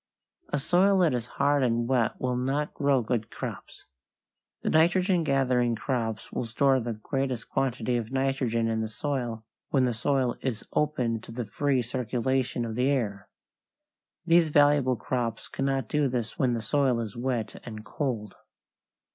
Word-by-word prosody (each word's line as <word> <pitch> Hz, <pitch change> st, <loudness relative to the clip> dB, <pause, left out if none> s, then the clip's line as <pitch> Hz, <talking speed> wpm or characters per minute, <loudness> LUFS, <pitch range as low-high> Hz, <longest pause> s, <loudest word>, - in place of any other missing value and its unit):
A -, -, 0 dB
soil 185 Hz, +7 st, +3 dB
that 165 Hz, -6 st, +3 dB
is 120 Hz, -1 st, -2 dB
hard 145 Hz, 0 st, +3 dB
and 120 Hz, -2 st, +1 dB
wet 125 Hz, -3 st, +1 dB
will 125 Hz, -1 st, 0 dB
not 135 Hz, +4 st, -1 dB
grow 140 Hz, -4 st, +2 dB
good 110 Hz, -1 st, -1 dB
crops. -, -, -7 dB, 0.8 s
The -, -, 0 dB
nitrogen 175 Hz, +2 st, +3 dB
gathering 125 Hz, -4 st, +2 dB
crops 115 Hz, -3 st, -3 dB
will -, -, -2 dB
store 130 Hz, +4 st, +3 dB
the 120 Hz, -1 st, -3 dB
greatest 130 Hz, +2 st, -3 dB
quantity 125 Hz, -2 st, 0 dB
of 115 Hz, 0 st, -4 dB
nitrogen 130 Hz, -4 st, 0 dB
in 110 Hz, 0 st, 0 dB
the 110 Hz, -, -1 dB
soil 120 Hz, -2 st, -3 dB, 0.2 s
when 135 Hz, -2 st, +3 dB
the 125 Hz, -, 0 dB
soil 130 Hz, +1 st, 0 dB
is 120 Hz, -5 st, -3 dB
open 125 Hz, -7 st, 0 dB
to 115 Hz, -, -11 dB
the 120 Hz, 0 st, -4 dB
free 135 Hz, +3 st, 0 dB
circulation 125 Hz, +1 st, -1 dB
of 115 Hz, -, -4 dB
the 125 Hz, +4 st, +1 dB
air. 105 Hz, -8 st, -1 dB, 1.0 s
These 165 Hz, -1 st, +5 dB
valuable 145 Hz, -3 st, +4 dB
crops 115 Hz, 0 st, -3 dB
cannot 135 Hz, -3 st, -1 dB
do 150 Hz, +2 st, +1 dB
this 120 Hz, -3 st, -3 dB
when 125 Hz, -3 st, +2 dB
the 115 Hz, -, -4 dB
soil 130 Hz, 0 st, +2 dB
is 110 Hz, -3 st, -5 dB
wet 120 Hz, -3 st, -3 dB
and 110 Hz, -2 st, -8 dB
cold. 115 Hz, -5 st, -3 dB
125 Hz, 160 wpm, -27 LUFS, 115-140 Hz, 1.0 s, These